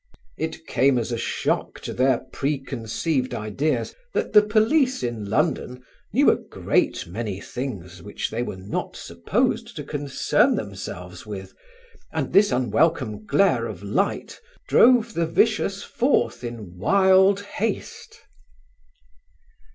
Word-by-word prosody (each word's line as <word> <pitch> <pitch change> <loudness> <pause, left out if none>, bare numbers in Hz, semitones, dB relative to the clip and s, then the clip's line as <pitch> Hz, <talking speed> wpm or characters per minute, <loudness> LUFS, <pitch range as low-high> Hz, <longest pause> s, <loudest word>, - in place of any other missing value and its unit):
It 160 0 -5
came 135 0 +3
as 120 0 -2
a 120 - -1
shock - - -2
to - - -5
their 130 -1 +2
preconceived 135 0 -2
ideas 115 +8 -1 0.2
that - - -1
the 210 - +9
police 225 - +2
in 120 -4 -3
London 125 -1 -1 0.3
knew - - +5
a - - +1
great - - -1
many 100 +2 -4
things 95 -9 -6
which 105 - -4
they 115 - -2
were 120 - -4
not 95 +2 -4
supposed 85 0 -1
to - - -5
concern 145 -2 +1
themselves 90 +2 -7
with, 95 -2 -7 0.6
and - - -3
this 205 -3 +5
unwelcome 125 -3 +1
glare 125 - +3
of 100 -3 -8
light 185 - -2 0.3
drove 235 -2 +5
the 170 -3 0
vicious 200 +2 +1
forth 255 - 0
in 110 -7 -7
wild 190 - +4
haste. 205 +1 -5
130 Hz, 125 wpm, -24 LUFS, -, 0.6 s, the